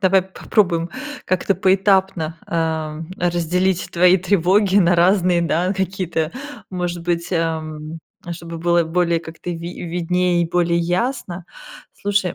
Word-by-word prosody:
давай 190 -1 +4
попробуем 180 -2 0 0.3
как-то 185 +2 +1
поэтапно, 190 -3 +2
эм, 160 -1 -2
разделить 175 +1 0
твои 180 +2 +5
тревоги 190 +1 +2
на 180 -3 +5
разные, 180 0 +3
да, 170 +2 +1
какие-то, 185 -4 -2 0.4
может 175 -2 -3
быть, 170 -1 -1
эм, 160 -2 -3 0.3
чтобы 170 0 -7
было 170 +1 +3
более, 170 0 +1
как-то, 165 +2 -8
ви 170 +1 -6
виднее 175 +1 +1
и 170 - -2
более 170 -1 +2
ясно. 180 0 -2 0.5
Слушай, 200 -3 0
175 Hz, 120 wpm, -20 LUFS, 165-185 Hz, 0.5 s, твои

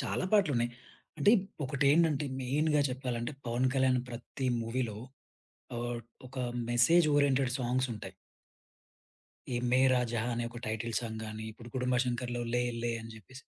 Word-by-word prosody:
చాలా - - -1
పాటలున్నాయి. 140 - +3 0.5
అంటే 205 - +5 0.3
ఒకటేండంటే, 145 +2 +3
మెయిన్‌గా 150 +4 +2
చెప్పాలంటే, 125 0 -3
'పవన్ 120 +2 +1
కళ్యాణ్' 130 -1 +3
ప్రత్తి 130 +3 -5 0.2
మూవీ‌లో 115 -2 -2 0.8
ఆహ్, 120 0 -2 0.3
ఒక 130 +1 -11 0.3
మెసేజ్ 140 +8 +5
ఓరియెంటెడ్ 135 -3 +3
సాంగ్సుంటయి. 125 -2 -2 1.4
'యే 120 - 0
మేరా 130 0 +5
జహా' 120 +1 0
అనే 120 0 -2
ఒక 120 0 -8
టైటిల్ 110 +1 -2
సాంగ్ 110 -2 -5
గాని, 110 0 -6
ఇప్పుడు 120 +2 -12
'గుడుంబా 125 -1 +1
శంకర్‌లో' 120 0 -2
'లే 125 - +3 0.2
లే' 120 0 0
అని 115 0 -9
జెప్పేసి 130 +5 -13
125 Hz, 135 wpm, -31 LUFS, 120-135 Hz, 1.4 s, అంటే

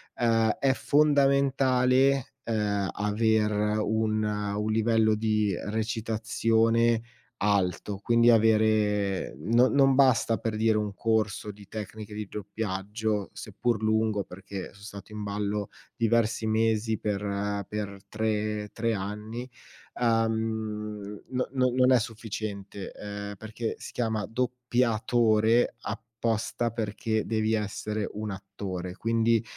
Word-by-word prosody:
Ehm, 115 -2 +3
è 135 -1 +3
fondamentale, 135 -2 +3
ehm, 105 -3 0
aver 105 0 +1
un 110 0 0
un 105 0 -1
livello 110 0 +3
di 105 -2 +1
recitazione 115 +1 +1 0.4
alto, 100 -1 0
quindi 120 0 +4
avere 110 - +3
no 115 - +3
non 135 -1 +4
basta, 130 -4 +4
per 110 -1 -3
dire, 110 0 +3
un 105 -1 -2
corso 110 -1 0
di 100 -1 -15
tecniche 110 0 -7
di 105 -1 -5
doppiaggio, 105 +1 -3
seppur 120 -3 -2
lungo, 110 -2 +1
perché 95 +1 -8
son 100 +1 -17
stato 100 +1 -10
in 105 -1 -5
ballo 100 0 -2 0.3
diversi 115 -1 +1
mesi 110 0 +1
per 100 -1 -2
per 100 -2 -4
tre 105 -1 -1
tre 115 0 0
anni; 105 +5 -5 0.4
uhm, 110 -3 -1
n 125 0 0
n - - -9 0.2
non 130 0 +5
è 125 - +6
sufficiente, 105 -3 -5
ehm, 100 0 -6
perché 110 +2 -4
si - - -9
chiama 110 -4 -1
doppiatore 120 -2 +2
apposta 115 0 -2
perché 110 -1 -2
devi 110 0 0
essere 105 0 -2
un 105 0 -3
attore. 95 -2 -6
Quindi 115 0 +2
110 Hz, 115 wpm, -28 LUFS, 105-115 Hz, 0.4 s, è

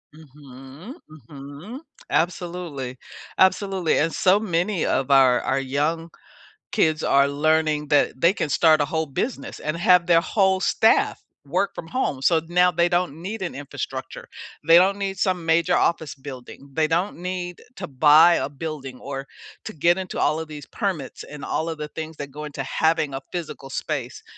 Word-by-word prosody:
Mhm, 140 - -13 0.4
mhm, 145 - -9 0.3
absolutely, 170 -7 -2 0.4
absolutely, 190 -2 +2
and 165 +2 +1
so 190 +2 +3
many 180 -2 -1
of 135 - 0
our 130 -3 +5
our 135 +1 0
young 150 +5 -2 0.6
kids 155 -1 +1
are 140 0 +4
learning 150 +1 +1
that 145 -3 +2
they 170 +5 +4
can 160 - -3
start 155 +2 +4
a - - +2
whole 160 +2 -2
business 155 - -4
and 155 +2 -3
have 180 0 +4
their 170 -1 +5
whole 190 0 +1
staff 220 +3 +2 0.3
work 180 +8 -1
from 165 - -7
home. 165 - -2
So 160 +4 +3
now 180 +1 +3
they 175 0 +2
don't 175 -3 -1
need 205 +5 -5
an 180 - -3
infrastructure. 140 0 -7 0.4
They 165 +1 +7
don't 190 +3 +4
need 195 -2 -4
some 185 -4 0
major 165 0 +2
office 160 -3 0
building. 135 0 -11
They 155 +2 +1
don't 175 +5 -1
need 180 0 -5
to 190 - -6
buy 155 +3 +6
a - - -1
building 140 -3 -7
or 135 0 -6 0.4
to - - -6
get 170 +3 +2
into 190 -1 -5
all 155 +2 +1
of 160 - -6
these 150 -2 -9
permits 185 - -4
and 150 0 -10
all 160 - -2
of 165 -1 -4
the 150 0 -5
things 160 +1 -7
that 145 -2 -7
go 150 +2 -7
into 140 -2 -5
having 160 +1 0
a 135 - -3
physical 165 -5 -6
space. - - -4
160 Hz, 170 wpm, -23 LUFS, 145-180 Hz, 0.6 s, They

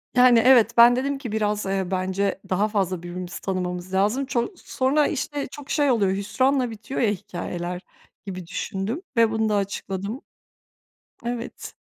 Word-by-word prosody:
Yani, 250 -2 +7
evet, 235 -3 +6
ben 240 +1 +8
dedim 275 +2 -1
ki, 245 -6 -6
"Biraz, 210 -1 0
eee, 195 -1 -1
bence 190 +1 -1
daha 200 +3 +2
fazla 190 -4 -1
birbirimizi 180 +1 -6
tanımamız 180 -1 -3
lazım." 210 +8 +2
Ço 260 - -1
sonra, 285 0 +1
işte, 290 0 -3
çok 290 -2 -10
şey 290 -3 +2
oluyor, 200 -5 +2
hüsranla 255 +6 +1
bitiyor 225 +5 -5
ya 225 - +3
hikâyeler, 180 -2 -5 0.4
gibi 185 -3 -6
düşündüm 215 - -3 0.2
ve 225 -1 +5
bunu 220 -1 +1
da 210 - +2
açıkladım. 200 +3 -3 1.0
Evet. 240 0 -5
210 Hz, 150 wpm, -24 LUFS, 190-250 Hz, 1.0 s, ben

